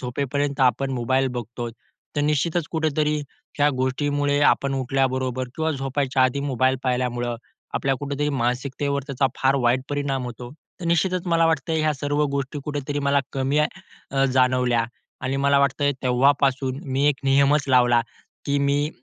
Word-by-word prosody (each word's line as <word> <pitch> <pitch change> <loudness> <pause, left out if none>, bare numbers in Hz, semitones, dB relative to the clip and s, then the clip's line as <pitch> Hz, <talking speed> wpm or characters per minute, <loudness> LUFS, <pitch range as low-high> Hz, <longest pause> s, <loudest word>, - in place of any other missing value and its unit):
झोपेपर्यंत 140 +2 -2
आपण 135 +1 +2
मोबाईल 130 +2 +1
बघतो 120 +1 -5 0.5
तर - - +2
निश्चितच 150 +2 0
कुठेतरी 155 -2 0 0.4
ह्या 145 +1 +4
गोष्टीमुळे 145 +2 0
आपण 140 -1 +2
उठल्याबरोबर 130 -1 -1
किंवा 160 0 0
झोपायच्या 135 -1 0
आधी 130 +2 0
मोबाईल 130 -1 +1
पाहिल्यामुळं, 125 -2 -1 0.4
आपल्या 135 0 +1
कुठेतरी 145 +1 -2
मानसिकतेवर 140 +2 -1
त्याचा 135 -1 +1
फार 135 +1 +3
वाईट 120 +2 +3
परिणाम 140 -2 -1
होतो. 120 0 -7 0.3
तर - - -6
निश्चितच 180 +2 +1
मला 165 -1 +3
वाटतं 160 0 0
ह्या 155 -1 +2
सर्व 145 +2 0
गोष्टी 140 +1 -3
कुठेतरी 145 -1 -3
मला 140 0 +2
कमी 135 +2 0
अ, 150 -4 -2
जाणवल्या 125 -2 +2 0.4
आणि 130 +1 -2
मला 140 0 +3
वाटतंय 140 +1 +2
तेव्हापासून 135 +1 +2
मी 135 +2 +1
एक 140 - +2
नियमच 140 +2 +4
लावला, 125 -2 +5 0.5
की 140 0 +1
मी 140 +1 +1
140 Hz, 145 wpm, -23 LUFS, 130-145 Hz, 0.5 s, लावला